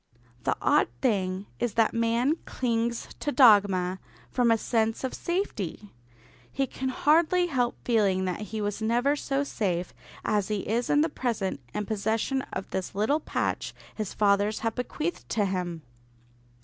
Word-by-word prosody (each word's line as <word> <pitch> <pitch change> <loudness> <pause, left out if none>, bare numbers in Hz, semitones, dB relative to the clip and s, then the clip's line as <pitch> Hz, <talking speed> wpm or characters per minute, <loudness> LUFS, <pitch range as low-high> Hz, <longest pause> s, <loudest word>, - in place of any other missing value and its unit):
The - - +1
odd - - +4
thing 190 - 0
is 240 -2 -1
that 225 -1 +3
man 230 +4 +2
clings 235 -1 -1
to 290 - -1
dogma 200 -8 +5 0.3
from 245 -2 +2
a 225 - +5
sense 225 +1 0
of 260 - -2
safety. 215 - -3 0.6
He 275 - 0
can 265 0 -4
hardly 330 +6 +3
help 255 -8 0
feeling 200 -5 +2
that 180 -2 -2
he 220 -1 -3
was 205 +1 -2
never 240 +6 +2
so 280 -1 -1
safe 185 -10 -2 0.3
as 205 -3 +1
he 210 -2 -2
is 235 +3 0
in 290 - +4
the 320 - +3
present 225 - -2
in 210 - -3
possession 220 +5 0
of 190 - -4
this 190 0 -3
little 220 +10 +2
patch - - -2 0.2
his 215 -3 -4
fathers 205 +1 +2
have 225 -1 0
bequeathed 300 +8 -4
to 210 -3 +1
him. 180 -4 -3
225 Hz, 155 wpm, -27 LUFS, 200-255 Hz, 0.6 s, dogma